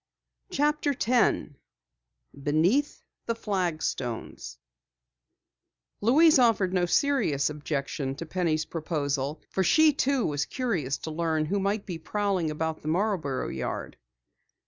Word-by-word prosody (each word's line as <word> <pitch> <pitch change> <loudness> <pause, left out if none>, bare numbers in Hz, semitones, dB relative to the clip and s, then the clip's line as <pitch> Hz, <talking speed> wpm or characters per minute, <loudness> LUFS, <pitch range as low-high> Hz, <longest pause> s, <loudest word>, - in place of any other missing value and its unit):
CHAPTER 295 0 +1
10 230 - +1 0.8
BENEATH 165 - +1 0.2
THE 230 - 0
FLAGSTONES 170 - -3 1.4
Louise 295 +7 +6
offered 215 -7 +3
no 180 -1 +2
serious 180 - +2
objection 140 -2 -3
to 165 - -6
Penny's 160 -2 0
proposal, 150 -3 -2
for 190 - +1
she 315 - +5
too 275 -2 +1
was 150 0 -1
curious 175 - -2
to 160 - -6
learn 160 -1 0
who 200 +6 -1
might 200 +2 -1
be 175 -4 -5
prowling 195 -2 -1
about 160 +1 -3
the - - -8
Marborough 165 -6 0
yard. 65 - -4
170 Hz, 115 wpm, -27 LUFS, 150-225 Hz, 1.4 s, Louise